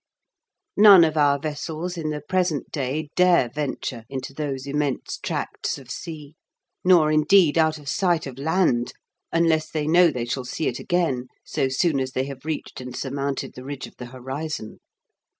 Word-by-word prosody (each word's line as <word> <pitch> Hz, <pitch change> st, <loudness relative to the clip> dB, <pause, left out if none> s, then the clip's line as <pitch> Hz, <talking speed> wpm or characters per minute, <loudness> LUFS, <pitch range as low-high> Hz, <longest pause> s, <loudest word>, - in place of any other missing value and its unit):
None 200 Hz, -4 st, +9 dB
of 160 Hz, -1 st, +1 dB
our 145 Hz, -2 st, +4 dB
vessels 155 Hz, +4 st, -4 dB
in 160 Hz, -3 st, -3 dB
the 150 Hz, -1 st, -3 dB
present 180 Hz, -2 st, -1 dB
day 145 Hz, +2 st, -2 dB
dare 180 Hz, -9 st, +4 dB
venture 135 Hz, -5 st, -4 dB
into 135 Hz, 0 st, -5 dB
those 140 Hz, -2 st, -4 dB
immense 145 Hz, -1 st, -2 dB
tracts -, -, -3 dB
of 130 Hz, -3 st, -11 dB
sea, 155 Hz, -3 st, -7 dB, 0.5 s
nor, 170 Hz, -4 st, +5 dB
indeed, 155 Hz, +1 st, +5 dB
out 160 Hz, -1 st, +3 dB
of 145 Hz, -2 st, -14 dB
sight 175 Hz, +2 st, +1 dB
of 135 Hz, -1 st, -8 dB
land, 150 Hz, -6 st, +1 dB, 0.4 s
unless 165 Hz, -2 st, +2 dB
they 155 Hz, -2 st, -2 dB
know 170 Hz, +3 st, +5 dB
they 125 Hz, -5 st, -3 dB
shall 125 Hz, +2 st, -3 dB
see 155 Hz, -, -2 dB
it 120 Hz, -, -2 dB
again 150 Hz, -8 st, 0 dB, 0.2 s
so 135 Hz, -, -1 dB
soon 140 Hz, +2 st, +1 dB
as 130 Hz, 0 st, -3 dB
they 130 Hz, -, 0 dB
have 140 Hz, 0 st, -9 dB
reached 155 Hz, -4 st, -4 dB
and 125 Hz, 0 st, -7 dB
surmounted 140 Hz, -1 st, -3 dB
the 125 Hz, -, -10 dB
ridge 140 Hz, 0 st, -6 dB
of -, -, -15 dB
the 125 Hz, -, -7 dB
horizon. 130 Hz, -1 st, -6 dB
150 Hz, 170 wpm, -24 LUFS, 135-160 Hz, 0.5 s, None